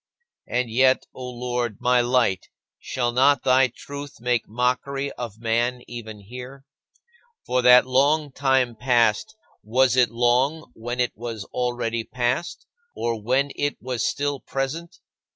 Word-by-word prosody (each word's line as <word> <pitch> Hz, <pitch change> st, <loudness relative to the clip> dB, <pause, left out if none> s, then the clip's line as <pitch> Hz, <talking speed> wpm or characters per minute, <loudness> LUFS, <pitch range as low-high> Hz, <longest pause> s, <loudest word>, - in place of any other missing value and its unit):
And 125 Hz, -2 st, -1 dB
yet, 130 Hz, +3 st, +3 dB
O 125 Hz, -1 st, -7 dB
Lord, 120 Hz, -3 st, -3 dB
my 125 Hz, 0 st, +3 dB
Light, 120 Hz, -6 st, +1 dB, 0.3 s
shall 120 Hz, -2 st, -2 dB
not 130 Hz, +2 st, +3 dB
thy 130 Hz, 0 st, +5 dB
truth 140 Hz, +3 st, -9 dB
make 120 Hz, -1 st, 0 dB
mockery 125 Hz, +4 st, -1 dB
of 115 Hz, -4 st, -7 dB
man 120 Hz, +2 st, 0 dB
even 110 Hz, -3 st, -8 dB
here? 125 Hz, +6 st, -10 dB, 0.8 s
For 125 Hz, 0 st, +1 dB
that 125 Hz, 0 st, +7 dB
long 140 Hz, +3 st, +2 dB
time 130 Hz, -3 st, +1 dB
past: 115 Hz, -3 st, +1 dB, 0.3 s
was 125 Hz, +4 st, +2 dB
it 125 Hz, -3 st, +4 dB
long 125 Hz, +6 st, +1 dB
when 120 Hz, +2 st, -5 dB
it 125 Hz, -2 st, 0 dB
was 115 Hz, -2 st, -6 dB
already 120 Hz, -2 st, -1 dB
past, 125 Hz, +8 st, -2 dB, 0.3 s
or 115 Hz, -2 st, -2 dB
when 130 Hz, +6 st, +1 dB
it 145 Hz, 0 st, -1 dB
was 125 Hz, -2 st, -4 dB
still 145 Hz, -1 st, -1 dB
present? 135 Hz, +7 st, -4 dB
125 Hz, 135 wpm, -24 LUFS, 120-135 Hz, 0.8 s, that